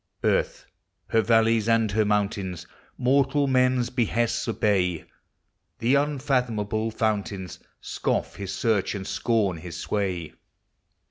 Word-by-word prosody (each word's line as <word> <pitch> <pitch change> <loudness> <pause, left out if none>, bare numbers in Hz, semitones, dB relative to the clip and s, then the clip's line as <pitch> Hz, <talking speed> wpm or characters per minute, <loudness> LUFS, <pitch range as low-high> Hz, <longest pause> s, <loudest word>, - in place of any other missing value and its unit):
Earth, - - 0 0.2
— - - -51
her 115 - +4
valleys 115 0 +3
and 115 -2 +3
her 110 +1 +2
mountains, 100 -4 -1 0.3
Mortal 135 +2 +2
man's 125 -2 +2
behests 120 -1 0
obey; 95 -6 0 0.7
The 120 +4 +1
unfathomable 125 -7 0
fountains 105 -4 -2 0.2
Scoff - - -2
his 100 -2 -5
search 105 -3 0
and 95 -1 -5
scorn 105 -7 0
his 85 +1 -8
sway. 90 -6 -2
110 Hz, 115 wpm, -25 LUFS, 100-120 Hz, 0.7 s, her